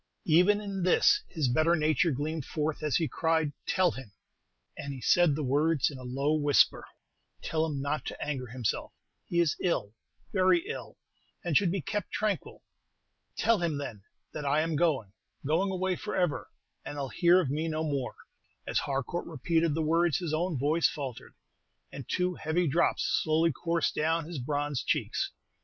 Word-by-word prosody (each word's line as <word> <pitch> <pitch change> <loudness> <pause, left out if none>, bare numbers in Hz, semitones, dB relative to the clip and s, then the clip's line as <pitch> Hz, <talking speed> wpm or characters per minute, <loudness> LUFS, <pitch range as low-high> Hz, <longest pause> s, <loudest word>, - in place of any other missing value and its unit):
Even 180 +6 +5
in 200 -2 -4
this 185 - +4
his 155 -7 -1
better 155 +7 +3
nature 155 +1 +2
gleamed 150 +2 -2
forth 150 +2 -2
as 150 -4 0
he 165 - +2
cried, 160 -2 0
'Tell 185 -2 +3
him' 130 -7 -10 0.6
and 140 -1 -6
he - - -8
said 170 +3 +4
the 155 - -2
words 145 +3 +2
in 135 - -9
a - - -9
low 135 +4 0
whisper 145 -2 +3 0.6
'tell 160 0 0
him 145 -3 -3
not 145 +2 -1
to - - -6
anger 135 -4 -3
himself; 120 -1 -3 0.3
he 170 - 0
is 170 -3 +3
ill, 110 - 0 0.4
very 185 -3 +3
ill, 125 -4 -7 0.5
and 170 -4 0
should 180 +2 +4
be 195 -1 -1
kept 205 +3 -3
tranquil. 215 -2 -2 0.7
Tell 230 -3 +3
him, 165 -4 0
then, 125 -8 -6 0.3
that 150 - -5
I 145 +2 +2
am 160 0 -1
going 140 - +1 0.3
going 165 +7 +2
away 185 0 0
forever, 180 -5 -2 0.3
and 145 - -7
he'll 140 -2 -3
hear 175 +5 +4
of 150 -8 -1
me 155 +3 -1
no 160 0 -1
more.'" 140 -5 -2 0.5
As - - 0
Harcourt 140 +5 -3
repeated 165 +1 0
the 160 - 0
words, 165 -1 +2
his 170 -4 -3
own 165 0 0
voice 150 +5 +2
faltered, 135 -6 -7 0.6
and 135 -4 -9
two 180 0 0
heavy 170 +2 0
drops 165 +5 +2 0.2
slowly 160 +1 +2
coursed 165 +3 -1
down 160 +1 0
his 165 -3 -6
bronzed 145 -1 -2
cheeks. - - 0
155 Hz, 175 wpm, -29 LUFS, 140-170 Hz, 0.7 s, Even